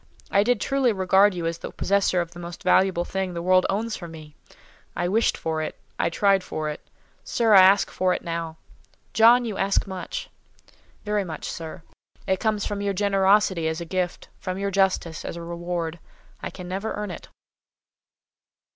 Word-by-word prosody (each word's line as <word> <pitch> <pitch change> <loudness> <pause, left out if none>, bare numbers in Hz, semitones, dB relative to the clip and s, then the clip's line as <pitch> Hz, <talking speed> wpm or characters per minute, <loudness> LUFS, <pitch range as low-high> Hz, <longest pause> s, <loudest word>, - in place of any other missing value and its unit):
I 200 - +4
did 245 +1 +2
truly 270 +1 +1
regard 190 0 +4
you 170 -2 -3
as 165 0 -2
the - - -6
possessor 195 -2 +1
of 170 -1 -6
the 175 - -11
most 170 -1 -8
valuable 185 -1 +3
thing 190 -1 -3
the 170 - -3
world 185 0 +4
owns 220 +3 -1
for 175 - -8
me. 155 -2 -11 0.6
I 175 0 0
wished 220 +5 +2
for 160 -1 -2
it: 155 - -5 0.2
I - - +2
tried 195 +2 +2
for 155 -3 -3
it. 150 - -6 0.4
Sir, 230 -2 +2
I 195 - +10
ask 190 +2 +5
for 185 0 +1
it - - -2
now." 165 -1 -4 0.6
"John, 235 +2 +6
you 215 -4 -4
ask 195 +1 +1
much." 195 - -5 0.8
"Very 210 -1 0
much, 160 -5 -6
sir. 165 0 -7 0.4
It - - -2
must 190 - -2
come 215 -1 +1
from 205 0 -3
your 200 -1 -1
generosity, 195 -3 +3
as 160 +1 -2
a 170 - -5
gift; 180 +1 -3
from 185 -1 -4
your 200 0 -2
justice, 190 -4 0
as - - -5
a 170 - -7
reward. 170 -1 -4 0.4
I - - -4
can 180 -2 -9
never 195 +4 -3
earn 210 -2 -4
it." - - -9
185 Hz, 190 wpm, -24 LUFS, 170-200 Hz, 0.8 s, I